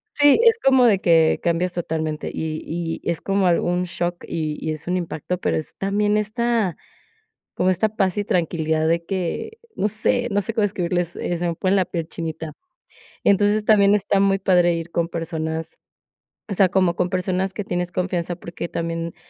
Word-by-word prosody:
Sí, 290 Hz, +3 st, +5 dB
es 460 Hz, -1 st, +6 dB
como 265 Hz, -, +5 dB
de 210 Hz, -5 st, +4 dB
que 165 Hz, -3 st, +4 dB
cambias 175 Hz, +1 st, 0 dB
totalmente 160 Hz, -3 st, -3 dB
y 155 Hz, -1 st, -3 dB
y 165 Hz, 0 st, -4 dB
es 170 Hz, -2 st, -1 dB
como 195 Hz, -1 st, +1 dB
algún 175 Hz, +1 st, +1 dB
shock, 175 Hz, 0 st, -3 dB
y 155 Hz, -2 st, -3 dB
y 155 Hz, -, -3 dB
es 155 Hz, -, -10 dB
un 180 Hz, +1 st, +1 dB
impacto, 175 Hz, 0 st, -3 dB
pero -, -, -1 dB
es 155 Hz, -, -6 dB
también 205 Hz, +2 st, +1 dB
esta, 220 Hz, -3 st, 0 dB, 0.8 s
como 185 Hz, -, +2 dB
esta 200 Hz, +4 st, +2 dB
paz 195 Hz, -3 st, 0 dB
y 205 Hz, -, +1 dB
tranquilidad 160 Hz, -5 st, 0 dB
de 170 Hz, +1 st, +1 dB
que, 190 Hz, -, -3 dB, 0.2 s
no 205 Hz, -, +1 dB
sé 240 Hz, +3 st, 0 dB
no 205 Hz, 0 st, +2 dB
sé 215 Hz, +4 st, -5 dB
cómo 220 Hz, -2 st, +1 dB
describirles, 175 Hz, -3 st, -1 dB
eh, 175 Hz, -, -2 dB
se 175 Hz, +1 st, -1 dB
me 170 Hz, -, -2 dB
pone 190 Hz, +3 st, +1 dB
la 190 Hz, -2 st, +3 dB
piel 170 Hz, -3 st, -4 dB
chinita. 160 Hz, -2 st, -5 dB, 0.7 s
Entonces 205 Hz, +1 st, +3 dB
también 205 Hz, -2 st, +5 dB
está 200 Hz, -1 st, +1 dB
muy 195 Hz, 0 st, +3 dB
padre 180 Hz, -2 st, +3 dB
ir 165 Hz, 0 st, -5 dB
con 170 Hz, 0 st, 0 dB
personas 160 Hz, -1 st, -4 dB, 0.7 s
o 205 Hz, -, -3 dB
sea, 190 Hz, -1 st, +4 dB
como 185 Hz, -2 st, +2 dB
con 180 Hz, 0 st, 0 dB
personas 185 Hz, +1 st, -1 dB
que 210 Hz, -, -3 dB
tienes 180 Hz, -1 st, -2 dB
confianza, 180 Hz, -1 st, -2 dB
porque 170 Hz, 0 st, -7 dB
también, 165 Hz, 0 st, -3 dB
180 Hz, 185 wpm, -22 LUFS, 165-200 Hz, 0.8 s, es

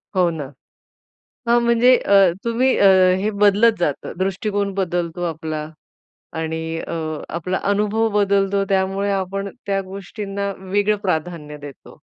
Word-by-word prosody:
हो 180 Hz, -2 st, +3 dB
ना. 160 Hz, -4 st, -5 dB, 1.0 s
हां, 235 Hz, +1 st, +4 dB
म्हणजे 235 Hz, +2 st, +5 dB
अ, 200 Hz, -, +2 dB, 0.3 s
तुम्ही 240 Hz, +3 st, +2 dB
अ, 200 Hz, -, +5 dB, 0.3 s
हे 210 Hz, -, 0 dB
बदलत 210 Hz, +3 st, +5 dB
जातं. 150 Hz, -5 st, -2 dB
दृष्टिकोन 200 Hz, +1 st, -1 dB
बदलतो 175 Hz, -2 st, -2 dB
आपला 155 Hz, -1 st, -4 dB, 0.8 s
आणि 160 Hz, 0 st, -3 dB, 0.2 s
अ, 170 Hz, -, -5 dB, 0.4 s
आपला 180 Hz, +3 st, -2 dB
अनुभव 210 Hz, +2 st, +1 dB
बदलतो. 200 Hz, 0 st, +2 dB
त्यामुळे 195 Hz, +1 st, 0 dB
आपण 195 Hz, +1 st, -2 dB, 0.2 s
त्या 195 Hz, -1 st, 0 dB
गोष्टींना 200 Hz, +1 st, -5 dB
वेगळं 205 Hz, +2 st, 0 dB
प्राधान्य 160 Hz, -3 st, -3 dB
देतो. 145 Hz, -3 st, -12 dB
195 Hz, 125 wpm, -20 LUFS, 175-205 Hz, 1.0 s, म्हणजे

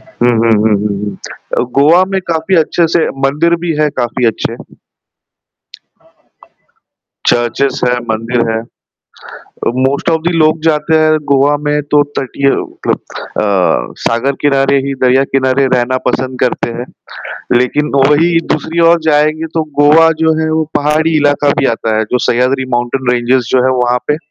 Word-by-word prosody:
हुँ, 120 Hz, 0 st, -1 dB
हुँ, 115 Hz, -1 st, +2 dB
हुँ, 110 Hz, -1 st, +2 dB
हुँ, 105 Hz, -1 st, -2 dB
हुँ। 100 Hz, -2 st, -6 dB, 0.4 s
अ, -, -, +2 dB, 0.2 s
गोवा 165 Hz, +6 st, +5 dB
में 190 Hz, -, 0 dB
काफ़ी 165 Hz, +3 st, 0 dB
अच्छे 165 Hz, +1 st, +2 dB
से 165 Hz, 0 st, +1 dB, 0.2 s
मंदिर 165 Hz, +5 st, +1 dB
भी 170 Hz, -, 0 dB
है 150 Hz, -, +2 dB
काफ़ी 120 Hz, 0 st, -1 dB
अच्छे। 115 Hz, -, -2 dB, 2.7 s
चर्चेज 130 Hz, +3 st, 0 dB
है, 125 Hz, 0 st, 0 dB
मंदिर 115 Hz, +1 st, -1 dB
है। 110 Hz, -, -1 dB, 1.1 s
अ, -, -, +3 dB, 0.2 s
मोस्ट 140 Hz, +4 st, -2 dB
ऑफ 160 Hz, -1 st, +1 dB
दी 175 Hz, -, +1 dB
लोग 155 Hz, 0 st, +2 dB
जाते 160 Hz, 0 st, +1 dB
हैं 155 Hz, 0 st, +3 dB
गोवा 140 Hz, +1 st, +3 dB
में 150 Hz, 0 st, +1 dB
तो 145 Hz, -, +5 dB, 0.2 s
तटीय 135 Hz, +1 st, -1 dB
मतलब -, -, -3 dB, 0.4 s
अ, 95 Hz, -, 0 dB
सागर 120 Hz, +4 st, 0 dB
किनारे 140 Hz, -1 st, +2 dB
ही, 140 Hz, -, -2 dB
दरिया 130 Hz, +1 st, +3 dB
किनारे 135 Hz, 0 st, +1 dB
रहना 125 Hz, +1 st, 0 dB
पसंद 130 Hz, 0 st, -2 dB
करते 125 Hz, -1 st, 0 dB
हैं। 120 Hz, -, -4 dB, 0.7 s
लेकिन 145 Hz, +4 st, -1 dB
वही 150 Hz, +5 st, +3 dB
दूसरी 160 Hz, +3 st, -2 dB
ओर 170 Hz, -, +3 dB
जाएँगें, 155 Hz, +1 st, +1 dB
तो 160 Hz, -, +1 dB, 0.2 s
गोवा 160 Hz, +3 st, +5 dB
जो 160 Hz, 0 st, +3 dB
है 160 Hz, -, -1 dB
वो 160 Hz, 0 st, 0 dB
पहाड़ी 155 Hz, +2 st, +1 dB
इलाका 145 Hz, -1 st, +1 dB
भी -, -, +2 dB
आता 110 Hz, -1 st, -2 dB
है, 110 Hz, -, +1 dB
जो 125 Hz, -, +2 dB
सह्याद्री 130 Hz, +2 st, +1 dB
माउंटेन 120 Hz, +1 st, -2 dB
रेंजेज़ 120 Hz, 0 st, 0 dB
जो 125 Hz, -, +4 dB
है 130 Hz, -, +2 dB
वहाँ 125 Hz, 0 st, +1 dB
पे, 150 Hz, -, +1 dB
140 Hz, 160 wpm, -13 LUFS, 125-155 Hz, 2.7 s, गोवा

